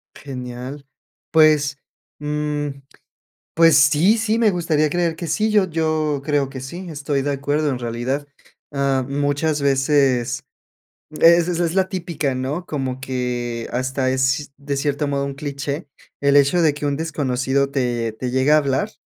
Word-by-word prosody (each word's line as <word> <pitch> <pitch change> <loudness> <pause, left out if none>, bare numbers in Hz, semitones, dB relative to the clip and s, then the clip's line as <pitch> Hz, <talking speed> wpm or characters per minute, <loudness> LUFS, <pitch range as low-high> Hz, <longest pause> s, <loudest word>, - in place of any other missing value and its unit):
Genial. 130 +1 -7 0.5
Pues, 150 -3 +4 0.4
mm, 150 0 -2 0.9
pues 165 -2 +6
sí, 150 - +5
sí, 225 0 +1
me 225 -2 +4
gustaría 160 -4 +1
creer 170 0 0
que 170 - -5
sí. 215 +6 0
Yo 205 -3 +3
yo 155 -3 0
creo 145 -2 +1
que 135 -2 -8
sí. 175 +8 -7
Estoy 145 -2 -2
de 145 +1 -1
acuerdo 145 +2 0
en 130 - -2
realidad. 120 +4 -3 0.5
Ah, 140 -2 +1
muchas 145 +2 0
veces 135 -3 +2 0.8
es 170 0 +6
es 175 - -1
es 170 0 0
la 190 -1 +2
típica, 165 -7 -2
¿no?, 140 +7 -3
como 130 -4 -4
que, 120 -3 -3
hasta 130 +1 -1
es 135 +3 0
de 140 0 -3
cierto 145 +1 -1
modo, 140 0 -1
un 140 - -4
cliché, 140 +1 -5 0.3
el 140 0 +4
hecho 145 +5 +4
de 155 -3 +4
que 145 0 -5
un 145 - 0
desconocido 140 -3 0
te 120 -4 -1
te 125 +3 -4
llegue 130 +3 +2
a - - +7
hablar 145 +8 0
145 Hz, 155 wpm, -21 LUFS, 135-155 Hz, 0.9 s, a